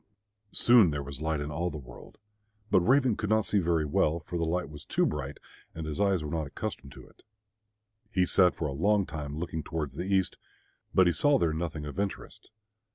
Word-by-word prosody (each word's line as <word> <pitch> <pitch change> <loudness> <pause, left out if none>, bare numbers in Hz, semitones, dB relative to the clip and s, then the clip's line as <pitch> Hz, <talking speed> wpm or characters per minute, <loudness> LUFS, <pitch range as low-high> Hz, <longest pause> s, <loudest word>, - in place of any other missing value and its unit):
Soon 120 -7 +6
there 75 -2 -3
was 70 0 -7
light 80 -1 -1
in 75 +1 -4
all 85 +4 -1
the 80 - -6
world. 60 -4 -13 0.5
But - - +6
Raven 125 +4 +3
could 110 -1 -3
not 110 -1 +3
see 105 - +2
very 85 -3 +1
well, 75 +2 +1
for 85 - -8
the 85 - 0
light 85 +1 -1
was 75 0 -10
too - - +1
bright 70 +2 -3 0.4
and 80 -1 -5
his 75 +4 -3
eyes 95 -5 +2
were 75 - -5
not 80 -3 -2
accustomed 70 -2 -6
to - - -12
it. - - -23 0.9
He 95 -4 +2
sat 90 0 +4
for 80 - -2
a 100 +8 +1
time 75 -3 -6
looking 80 -1 -3
towards 75 -2 -4
the 95 +3 -4
east, 95 -2 +1 0.5
but 95 - +5
he 85 - +3
saw 145 - +4
there 85 -9 +1
nothing 80 -2 -4
of 75 +6 -6
interest. 100 -1 -5
85 Hz, 210 wpm, -29 LUFS, 75-95 Hz, 0.9 s, Soon